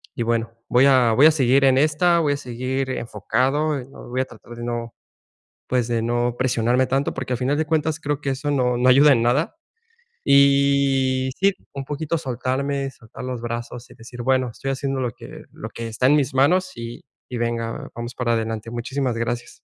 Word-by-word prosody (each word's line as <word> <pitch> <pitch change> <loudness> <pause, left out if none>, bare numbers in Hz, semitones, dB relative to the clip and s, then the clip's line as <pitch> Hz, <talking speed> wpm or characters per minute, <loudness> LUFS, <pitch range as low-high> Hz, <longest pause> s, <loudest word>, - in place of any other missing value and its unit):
y 120 - -1
bueno, 115 0 -1 0.2
voy 125 +2 +4
a 125 -4 +4
voy 135 +6 +6
a 160 - +8
seguir 135 -2 +3
en 130 -1 +5
esta. 155 +4 +3
Voy 150 -3 +2
a 140 - -3
seguir 130 +1 -3
enfocado. 140 +5 0
No 135 - -13
voy 130 +1 -1
a - - -1
tratar 120 -2 -13
de 120 - -7
no, 120 -1 -4 0.7
pues, 125 -2 0
de 115 -1 0
no 120 +1 0
presionarme 125 0 +2
tanto 135 +2 0
porque, 130 -1 -4
al 125 - -1
final 130 +4 0
de 155 - +1
cuentas, 155 0 0
creo 145 -2 -2
que 140 - -2
eso 145 +2 -2
no 125 -3 +1
no 125 +1 +2
ayuda 140 +3 +7
en 115 - +2
nada. 135 - +1 0.7
Y 140 -1 +3
sí, 195 +1 +4 0.2
un 140 - -5
poquito 150 +3 -2
soltarme, 135 +1 -2
soltar 115 -3 -13
los 125 -2 -4
brazos 120 +1 -6
y - - -14
decir: 120 +2 -9
"Bueno, 130 0 +2
estoy 135 +4 -5
haciendo 135 0 -2
lo 125 -3 -2
que - - -12
lo - - -7
que 115 - -6
está 115 +3 0
en 145 +3 +5
mis 140 -1 0
manos 180 +8 +3
y 115 0 -7 0.3
y 125 - -5
venga, 115 -1 -3
vamos 120 +1 -6
para 125 -2 0
adelante". 115 -1 -2
Muchísimas 125 +1 -2
gracias. 120 +1 -4
130 Hz, 200 wpm, -22 LUFS, 120-140 Hz, 0.7 s, a